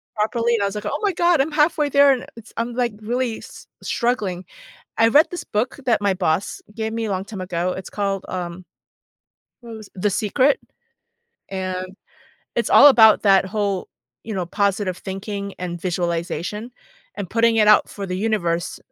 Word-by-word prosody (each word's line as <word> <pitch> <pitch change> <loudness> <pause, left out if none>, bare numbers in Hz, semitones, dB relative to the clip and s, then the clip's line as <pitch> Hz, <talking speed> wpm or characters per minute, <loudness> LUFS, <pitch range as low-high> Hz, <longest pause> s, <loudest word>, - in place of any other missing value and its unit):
properly." 230 +2 +1
and 205 - 0
I - - +2
was 200 - -2
like, 210 0 -5
"Oh 285 - -2
my 400 -2 +2
god! 345 -4 +3
I'm 305 - -1
halfway 300 0 +2
there 280 0 +6
and 255 -2 -1
it's 230 -2 -13
I'm, 235 +1 -2
like, 240 -2 -1
really 240 +1 -2
s - - -13 0.2
struggling." 200 -7 -1 0.5
I 225 0 +5
read 300 +7 +5
this 355 - -5
book 240 +6 -2
that 235 - +3
my 200 -1 +2
boss 180 0 -1
gave 220 -1 -3
me 225 -1 -2
a - - -3
long 190 0 -2
time 200 -2 -8
ago, 180 0 -2
it's 190 - -7
called, 195 -2 -2
um 180 0 -5 1.0
what 230 -1 -9
was 215 -2 -12
The 200 +2 0
Secret 240 +9 +2 0.9
and, 185 -1 -4 0.7
it's - - 0
all 290 - +9
about 220 -5 +7
that 195 -2 +4
whole, 200 -1 -2 0.4
you 220 - -5
know, 180 -2 -2
positive 200 -1 -1
thinking 200 +1 -5
and 175 -1 -5
visualization, 175 +4 -3 0.5
and 200 -3 -5
putting 230 0 +3
it 215 - +4
out 210 - +6
for 200 -1 -6
the 180 0 -4
universe. 180 -6 -1
210 Hz, 180 wpm, -21 LUFS, 185-235 Hz, 1.0 s, all